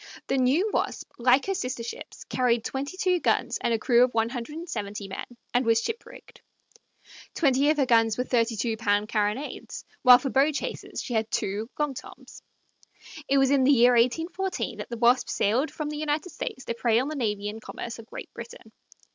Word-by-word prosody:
The 270 - +1
new 275 +11 +3
Wasp, - - -2
like 250 +3 +4
her 390 - 0
sister 255 -10 -3
ships, 230 - -8
carried 240 -3 0
twenty 280 +7 -4
two 365 -2 +2
guns - - 0
and - - 0
a 230 - +2
crew 240 +2 +4
of 250 -2 0
one 225 0 +2
hundred 245 +4 -6
and 340 +2 -7
seventy 205 - -5
men, 195 - -6 0.3
and 245 +1 +3
was 230 -1 +3
ship 455 - -4
rigged. - - -15 0.9
Twenty 280 -2 +3
of 305 - +2
her 275 - +3
guns 225 -3 +3
were 250 - +1
32 230 -2 0
pound 210 -1 +1
carronades, 215 +6 -2 0.2
while 250 -1 +9
for 260 +1 -4
bow 275 +3 +3
chasers 285 - -5
she 245 - -5
had 220 -1 0
two 205 +4 -2
"long 295 -2 0
Toms." 260 - -12 0.9
It 275 - +3
was 270 0 +4
in 275 -2 +4
the 270 - +5
year 245 -2 +6
1814 330 +11 0
that - - -6
the 235 - -5
Wasp 245 +2 +3
sailed 245 +9 +1
from 305 -1 -5
the 300 - -5
United 310 +3 -2
States 260 -2 -6
to - - -2
prey 230 -1 +1
on 255 +3 +1
the 310 - -4
navy 210 -6 -2
and 215 +2 -6
commerce 235 +1 -7
of 225 - -12
Great - - -9
Britain. 235 -1 -10
250 Hz, 205 wpm, -26 LUFS, 230-285 Hz, 0.9 s, while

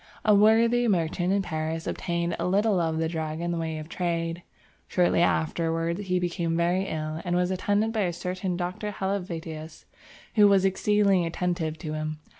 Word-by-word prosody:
A 215 - +6
worthy 230 +3 +4
merchant 175 -2 +1
in 200 0 +2
Paris 160 -1 -3
obtained 170 -1 -2
a - - 0
little 200 +1 +2
of 160 -2 0
the 160 0 0
drug 160 -1 -3
in 170 0 -2
the 170 - -2
way 160 -1 -3
of 155 0 -7
trade. 170 -1 -2 0.5
Shortly 175 -2 +2
afterwards 165 +3 0
he 180 0 +1
became 170 -2 -1
very 175 +3 +1
ill 155 0 -4
and 175 0 -1
was 180 +1 +1
attended 205 +4 0
by 215 -4 +1
a 175 - 0
certain 180 +1 -3
Dr. 180 +4 -3
Helvetius, 170 -5 -5 0.5
who 210 -2 +6
was 195 -1 +4
exceedingly 195 -1 +3
attentive 165 -2 -2
to 155 -1 -5
him. 155 0 -3
175 Hz, 175 wpm, -26 LUFS, 165-195 Hz, 0.5 s, A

